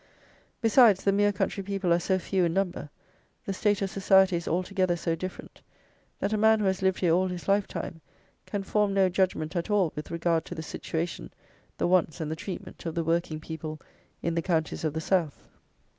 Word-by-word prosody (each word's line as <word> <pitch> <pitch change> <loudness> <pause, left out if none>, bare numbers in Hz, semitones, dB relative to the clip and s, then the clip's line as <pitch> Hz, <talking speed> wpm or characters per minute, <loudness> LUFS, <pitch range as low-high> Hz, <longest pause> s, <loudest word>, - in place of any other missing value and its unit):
Besides, 225 -4 +5
the 200 - +3
mere 205 +1 +3
country 195 0 -2
people 195 -2 0
are 170 - +3
so 185 +2 +1
few 185 +1 0
in 170 0 -1
number, 185 -6 -1 0.6
the 195 - -2
state 205 +1 +1
of 195 - -2
society 190 -1 +4
is 170 -1 -3
altogether 185 +1 0
so 165 -1 -1
different, 185 +3 -7 0.6
that 215 - -1
a 215 - +1
man 220 0 +5
who 210 - 0
has 190 0 0
lived 190 0 +1
here 175 -3 +3
all 185 +2 +3
his 180 -1 -6
life 200 0 +2
time, 165 - -6 0.5
can 200 -2 -3
form 205 0 +1
no 190 -1 +4
judgment 180 -3 0
at 170 +4 -2
all 195 -6 +2
with 150 0 -6
regard 170 -1 0
to 175 - -7
the 160 - -5
situation, 165 +1 -4 0.5
the - - +1
wants, 175 -5 +2
and 155 -1 -3
the - - -2
treatment 185 +4 -7
of 165 - -4
the 170 - 0
working 165 -1 0
people 155 -1 -6 0.4
in 170 - 0
the 170 - 0
counties 165 -3 -1
of 155 -2 0
the 160 - -3
South. 165 -4 0
185 Hz, 205 wpm, -27 LUFS, 165-195 Hz, 0.6 s, Besides